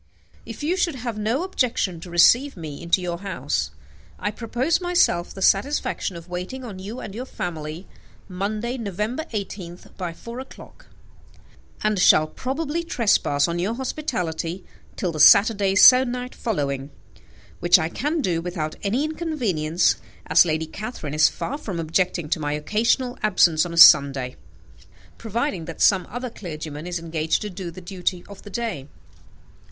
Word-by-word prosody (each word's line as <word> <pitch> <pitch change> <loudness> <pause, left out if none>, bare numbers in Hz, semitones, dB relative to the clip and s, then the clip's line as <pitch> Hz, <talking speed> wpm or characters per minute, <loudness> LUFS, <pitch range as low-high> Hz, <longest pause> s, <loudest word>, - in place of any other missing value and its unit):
If - - -8
you 345 +5 0
should 340 -5 0
have 240 -3 -4
no 230 +9 0
objection 240 - -1
to 175 - -10
receive 235 +10 +4
me 155 -4 -7
into 170 +2 +1
your 170 -1 -3
house, 195 -1 -2 0.5
I 205 - -2
propose 245 - -1
myself 350 - +2
the 195 - -5
satisfaction 200 -3 +1
of 170 0 -10
waiting 180 +9 -6
on 205 -6 -8
you 210 +6 -7
and 195 - -7
your 250 +5 -6
family, 165 -2 -5 0.4
Monday, 215 +7 -3
November 215 - -3
18th, 190 -5 -7
by 180 -3 -4
four 235 +8 -9
o'clock, 265 - -12 1.0
and 215 -2 +1
shall 155 -4 +6
probably 290 - -3
trespass 205 - +2
on 170 0 -2
your 200 +6 -1
hospitality 190 - -3 0.3
till 180 - -2
the 155 - -6
Saturday 200 +3 +6
se'nnight 250 +3 +6
following, 140 - -3 0.7
which 175 +1 +6
I 160 -2 -1
can 295 - -2
do 170 -8 0
without 165 -3 -4
any 225 +8 0
inconvenience, 230 - 0 0.3
as - - +5
Lady 160 -1 -1
Catherine 165 - -7
is 155 +1 +5
far 285 +4 -5
from 195 - -5
objecting 170 0 0
to 160 - 0
my 145 -1 -2
occasional 230 - 0
absence 175 -6 +3
on 170 - -7
a - - -7
Sunday, 140 -5 +7 0.8
provided 225 - -3
that 165 - -8
some 185 -4 +4
other 245 +1 -5
clergyman 155 -5 -7
is 180 0 -2
engaged 160 +1 -1
to 210 - -5
do 185 -1 -6
the 170 +2 -10
duty 180 0 -3
of 200 -1 -12
the 205 - -11
day. 205 - -4
190 Hz, 155 wpm, -23 LUFS, 170-240 Hz, 1.0 s, Sunday